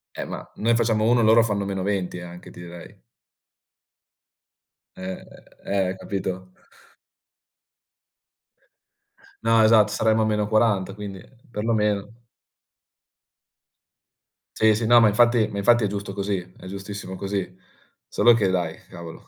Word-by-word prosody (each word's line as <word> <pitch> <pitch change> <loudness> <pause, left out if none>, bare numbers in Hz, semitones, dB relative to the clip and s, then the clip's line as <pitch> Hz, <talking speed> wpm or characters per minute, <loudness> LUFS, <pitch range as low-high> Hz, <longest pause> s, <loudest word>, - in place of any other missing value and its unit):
Eh, - - -5
ma - - -7
noi 115 +2 +2
facciamo 110 -2 +1
1, 120 0 +3
loro 115 +1 +6
fanno 105 -3 -1
-20 95 -2 -2
anche, 90 0 -11
ti - - -14
direi. 85 0 -12 2.0
Eh, 95 0 -7 0.4
eh, 95 -2 0
eh, 95 - -4
capito? 95 -1 -5 2.9
No, 115 0 +4
esatto, 110 -1 +5
saremmo 110 0 +1
a - - +2
-40, 105 -2 +1
quindi, 100 -2 -8
ehm, 120 +5 -21
perlomeno. 105 0 -1 2.3
Sì, 110 -1 +4
sì, 110 +1 -2
no, 120 +1 +6
ma 110 - +5
infatti 120 +1 +3
ma 100 - -7
infatti 120 +3 +3
è 105 - +2
giusto 100 0 -5
così, 100 0 -2 0.2
è - - -12
giustissimo 100 0 -7
così. 95 -1 -4 0.5
Solo 120 -1 +4
che 105 -4 +1
dai, 90 -3 -1
cavolo, 85 -2 -11
105 Hz, 125 wpm, -23 LUFS, 95-110 Hz, 2.9 s, loro